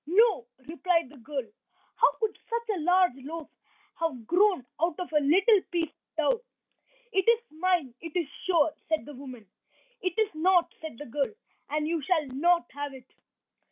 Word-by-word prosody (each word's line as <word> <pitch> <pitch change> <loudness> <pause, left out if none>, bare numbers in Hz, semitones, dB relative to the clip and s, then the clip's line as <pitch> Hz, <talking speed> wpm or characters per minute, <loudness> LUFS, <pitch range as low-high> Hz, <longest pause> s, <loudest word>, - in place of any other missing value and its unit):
"No," 390 - +4 0.2
replied 335 -1 +1
the 290 - -14
girl. 270 +2 -4 0.5
"How - - +6
could 440 -2 0
such 465 0 -2
a - - -3
large 360 +3 +4
loaf 305 +4 -7 0.5
have 290 -9 -2
grown 360 - +3 0.2
out 335 0 +1
of 355 -3 -5
a 300 - +5
little 375 +9 +5
piece 335 -3 -1
of - - -53
dough?" 380 +10 +2 0.7
"It 385 +2 +3
is 465 0 +4
mine, 325 -5 +1
it 330 -1 -8
is 345 -4 +1 0.2
sure," 330 -4 +3 0.2
said 315 -1 +1
the 295 - -9
woman. 255 -4 -10 0.6
"It 365 -2 -2
is 435 -4 +2
not," 350 +2 +3
said 315 -7 -7
the 295 - -7
girl, 275 +3 -1 0.4
"and 300 +1 0
you 330 -1 0
shall 320 +1 +1
not 340 +7 +2
have 285 -1 -5
it." 255 -2 -13
330 Hz, 175 wpm, -28 LUFS, 290-370 Hz, 0.7 s, How